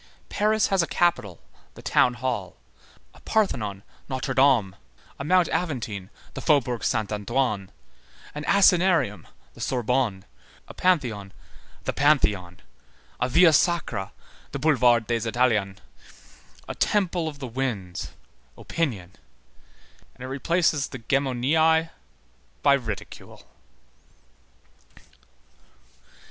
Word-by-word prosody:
Paris 215 0 +1
has 195 -2 +3
a 170 - -1
capital, 165 - 0 0.3
the - - -12
Town 125 - +3
Hall, 120 -6 -4 0.6
a - - -18
Parthenon, 105 - -1 0.3
Notre 130 +1 -3
Dame, 130 -8 +3 0.4
a - - -4
Mount 180 +3 +3
Aventine, 115 - -3 0.2
the - - -6
Faubourg 130 -6 +1
Saint 110 -1 -1
Antoine, 105 -2 -1 0.6
an 150 - -6
Asinarium, 180 - +3 0.3
the - - -13
Sorbonne, 125 -5 -1 0.4
a - - -10
Pantheon, 120 - 0 0.5
the - - -2
Pantheon, 105 -12 +1 0.6
a 125 - 0
Via 165 +3 +6
Sacra, 160 - 0 0.4
the - - -2
Boulevard 125 -6 +3
des 115 -1 -1
Italiens, 110 -5 +1 0.9
a - - -4
temple 180 -5 0
of 150 -2 -6
the 140 - -6
winds, 115 -8 -4 0.4
opinion; 110 - -3 1.0
and - - -11
it - - -5
replaces 150 +2 +1
the 130 - -8
Gemoniæ 140 +6 +1 0.7
by 140 - +6
ridicule. 115 -7 -5
130 Hz, 105 wpm, -25 LUFS, 110-160 Hz, 1.0 s, Via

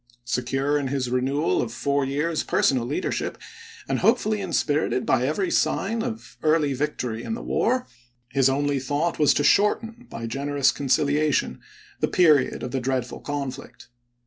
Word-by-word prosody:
Secure 135 +4 0
in 140 - -2
his 130 -2 -2
renewal 135 +5 +1
of 115 - -3
four 140 +4 0
years' 150 +4 -1
personal 125 -3 +1
lead 145 - -2
ership, - - -2 0.5
and - - 0
hopefully 215 -3 +2
inspirited 145 -7 0
by 130 0 +2
every 185 +6 -1
sign 225 0 +1
of 225 -1 -6
early 155 -2 +2
victory 125 -5 -3
in 225 - -3
the - - -7
war, 250 +2 0 0.4
his 135 +1 +3
only 140 +1 0
thought 145 +6 -1
was 150 - +5
to 145 - +1
shorten, 225 +6 +2
by 115 - -6
generous 140 +2 +1
conciliation, 145 +2 +1 0.4
the - - +1
period 155 -7 +3
of 125 - -4
the 135 - -1
dreadful 130 -1 -2
conflict. 135 -4 -6
145 Hz, 155 wpm, -24 LUFS, 130-155 Hz, 0.5 s, was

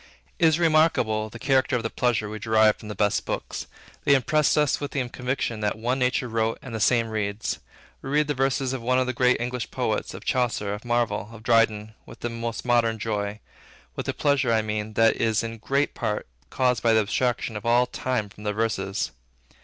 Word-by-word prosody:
It 165 - +6
is 160 -1 +3
remarkable, 155 -10 +2
the - - -10
character 135 -1 +2
of 120 - -1
the 115 - -3
pleasure 120 -4 0
we 110 +1 -6
derive 110 0 +4
from 110 - -11
the 105 - -6
best 105 +1 +1
books. - - -4 0.4
They 140 - +5
impress 150 +4 +2
us 150 -2 +2
with 145 - -4
the 130 -3 -2
conviction, 125 -3 -2
that 105 +1 -1
one 125 +4 -1
nature 125 0 +1
wrote 115 -1 0
and 130 - -8
the 110 - -3
same 115 0 +3
reads. 105 -1 -2 0.4
We 135 - -7
read 150 +2 +3
the 150 - -1
verses 135 0 0
of 130 - -4
one 125 +2 +1
of 130 - +2
the 130 - -2
great 125 +1 +3
English 125 0 -3
poets, - - -2
of - - -10
Chaucer, 120 -5 0
of 105 - -7
Marvell, 115 -4 0
of 110 -1 -12
Dryden, 110 -2 +2
with - - -13
the 120 - -2
most 115 0 -4
modern 120 -2 +2
joy, 105 -1 -3 0.5
with - - -4
a - - 0
pleasure, 140 -4 +2
I 110 -1 +2
mean, 105 0 -3
which 115 -1 +4
is 115 0 +1
in 115 0 -6
great 140 +5 0
part 105 - -2 0.2
caused 125 - +1
by 115 -1 +3
the 110 - +5
abstraction 120 +2 -1
of 105 - -5
all 120 +1 +4
time 125 -3 -2
from 105 +1 -14
their 105 -1 -1
verses. 100 - -1
115 Hz, 215 wpm, -25 LUFS, 110-130 Hz, 0.5 s, It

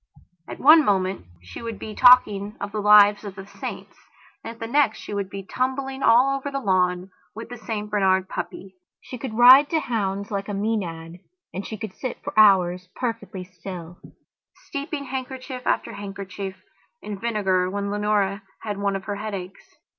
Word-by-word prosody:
At - - -7
one 310 +3 +7
moment 190 - 0 0.2
she 90 - -10
would 230 -2 -5
be 215 +2 -7
talking 210 -4 +5
of 200 - -5
the 215 - -3
lives 210 0 +6
of 200 -2 -7
the 195 -1 -9
saints 200 - -8 0.5
and - - -6
at - - -24
the 225 - -4
next 255 -1 +2
she - - -8
would 200 -2 -3
be 195 0 -7
tumbling 265 +3 -3
all 255 +4 +5
over 275 +1 -4
the 275 -1 -3
lawn 185 -3 0 0.2
with 225 +1 -8
the 245 - -8
St 215 -2 -4
Bernard 190 -2 +1
puppy. 190 0 -6 0.3
She 250 - -9
could 240 -4 -5
ride 260 +4 +8
to 325 - +1
hounds 200 -5 -3
like 200 0 -3
a 205 - -3
Maenad 180 -6 -3 0.3
and 190 +2 -5
she 220 - -6
could 210 -2 -7
sit 255 - -5
for - - -5
hours 185 -4 +4
perfectly 215 -6 -4
still, 180 -1 -9 0.7
steeping 280 +1 -5
handkerchief 260 -1 -6
after - - 0
handkerchief 195 -1 -7 0.5
in 205 -2 -6
vinegar 195 -5 0
when 200 +1 -3
Leonora 205 -1 0 0.2
had 205 -2 -4
one 200 -1 0
of 195 - -4
her 205 0 -4
headaches. 200 -3 -6
205 Hz, 175 wpm, -23 LUFS, 195-235 Hz, 0.7 s, ride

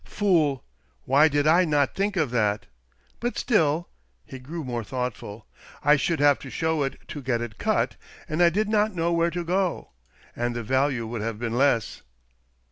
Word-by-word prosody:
"Fool! 160 - +1 0.4
Why 140 +4 +5
did 145 -1 0
I 170 +4 +5
not 145 -4 +1
think 200 +1 -1
of 155 -7 +1
that? 105 -4 0 0.5
But 240 +1 -3
still 170 - +1
" 60 -1 -41
— - - -43
he 130 - -9
grew 155 +6 -6
more 120 -3 -3
thoughtful 115 -2 -5
— - - -20
" - - -24
I 150 - +6
should 150 +2 0
have 145 -1 +4
to 135 - -9
show 160 0 -1
it 135 -1 -2
to 145 - -6
get 125 -3 -1
it 120 -3 -7
cut, - - 0 0.3
and 155 +3 -1
I 175 - +7
did 205 +5 0
not 215 -1 +1
know 170 0 0
where 170 0 +2
to 175 +1 -4
go. 185 +1 -1 0.4
And 120 0 -2
the 120 - -3
value 130 0 0
would 115 -1 -5
have 115 -1 -3
been 115 0 -3
less." 130 -4 +1
145 Hz, 205 wpm, -25 LUFS, 120-170 Hz, 0.5 s, I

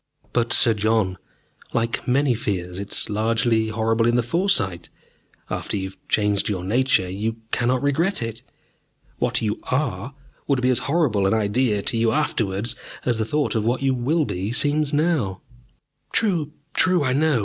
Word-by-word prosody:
"But, 120 -1 +1
Sir 115 - +5
John, 105 -3 +1 0.5
like 115 0 -1
many 135 +1 +3
fears, 95 -5 -3
it 100 - -6
is - - -1
largely 110 +1 +1
horrible 115 +1 +1
in 120 - +2
the 120 - +2
foresight. 120 - +1 0.6
After - - -3
you 95 -1 -3
have 95 - -15
changed 105 -1 +1
your 95 -4 -2
nature 110 -1 +2
you 105 +5 -3 0.2
cannot 125 +2 +1
regret 165 +8 +1
it. 115 0 -5 0.8
What - - 0
you 105 -1 -1
are 130 -2 -2 0.3
would 140 -3 +2
be 125 +1 +2
as 125 - +2
horrible 135 - +2
an 95 - +2
idea 105 0 +1
to 120 - -1
you 115 0 +2
afterwards 115 -6 0 0.3
as 120 -3 +1
the 110 - 0
thought 150 +5 0
of 110 -3 0
what 120 +4 0
you 135 -1 +2
will 145 +6 +1
be 95 +1 -3
seems 145 +3 +2
now." 145 - 0 0.7
"True, 170 -9 +1 0.2
true. 180 -4 +3
I 130 -2 +1
know 150 0 +2
it. - - 0
115 Hz, 170 wpm, -23 LUFS, 105-140 Hz, 0.8 s, Sir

